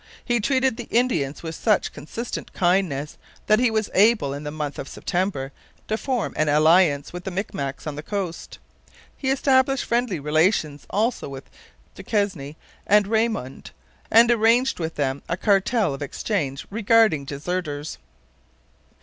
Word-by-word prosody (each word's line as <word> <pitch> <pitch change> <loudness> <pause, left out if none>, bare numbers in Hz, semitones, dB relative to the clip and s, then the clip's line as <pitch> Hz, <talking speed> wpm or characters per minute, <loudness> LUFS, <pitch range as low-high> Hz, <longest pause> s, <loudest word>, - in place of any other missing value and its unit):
He 240 -1 +1
treated 260 +1 +1
the - - -7
Indians 170 - 0
with 160 -1 -5
such 210 +4 +1
consistent 225 - -6
kindness 175 -6 0 0.3
that 215 +1 +4
he 250 -1 +3
was 220 -1 -1
able 205 -8 +3
in 145 +1 -6
the 150 - -4
month 150 -1 -5
of 135 - -5
September 175 -7 -2 0.4
to 215 - 0
form 245 0 -2
an 155 -1 +2
alliance 155 0 +4
with 180 0 -6
the 195 - -4
Micmacs 145 -8 -4
on 150 - -3
the 150 - -5
coast. 185 -1 -5 0.6
He 265 - -3
established 270 0 +2
friendly 235 -7 0
relations 155 0 +1
also 220 - -1
with 135 -1 -10 0.4
Duquesne 185 -9 -2 0.3
and 210 0 +5
Raymond, 220 - -2 0.4
and 230 +2 +6
arranged 235 +2 +3
with 160 -1 -3
them 140 -1 -1
a 170 - -1
cartel 200 - +2
of 135 - -7
exchange 145 -2 -3
regarding 220 -7 +3
deserters. 150 +1 -4
185 Hz, 145 wpm, -23 LUFS, 150-225 Hz, 0.6 s, and